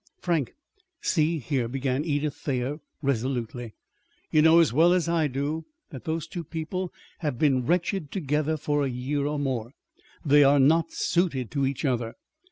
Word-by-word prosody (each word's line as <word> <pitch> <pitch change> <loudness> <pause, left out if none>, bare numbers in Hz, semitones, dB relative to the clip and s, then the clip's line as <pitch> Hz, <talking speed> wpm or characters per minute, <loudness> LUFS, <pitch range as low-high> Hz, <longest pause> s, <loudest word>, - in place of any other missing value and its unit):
"Frank, 165 -8 -1 0.4
see 160 0 +1
here," 135 -4 -1
began 135 +2 -1
Edith 145 -2 -1
Thayer 135 +2 -3 0.2
resolutely. 120 -3 -2 0.6
"You 155 - +5
know 160 +2 +7
as 165 -7 +4
well 165 +6 +5
as 180 -2 +1
I 165 -2 +2
do 145 +4 -3 0.3
that 135 -5 -9
those 160 0 -2
two 170 +1 -6
people 165 +4 -4 0.3
have 150 -7 -2
been 130 -3 +2
wretched 175 -1 0
together 155 -2 0
for 145 0 0
a 135 - 0
year 135 +3 -2
or 150 0 -1
more. 130 -4 -2 0.5
They 145 0 +6
are 140 +1 +5
not 160 +5 +4
suited 150 - 0
to 140 -2 +1
each 135 +2 -3
other. 120 -4 -1
145 Hz, 165 wpm, -26 LUFS, 130-160 Hz, 0.6 s, know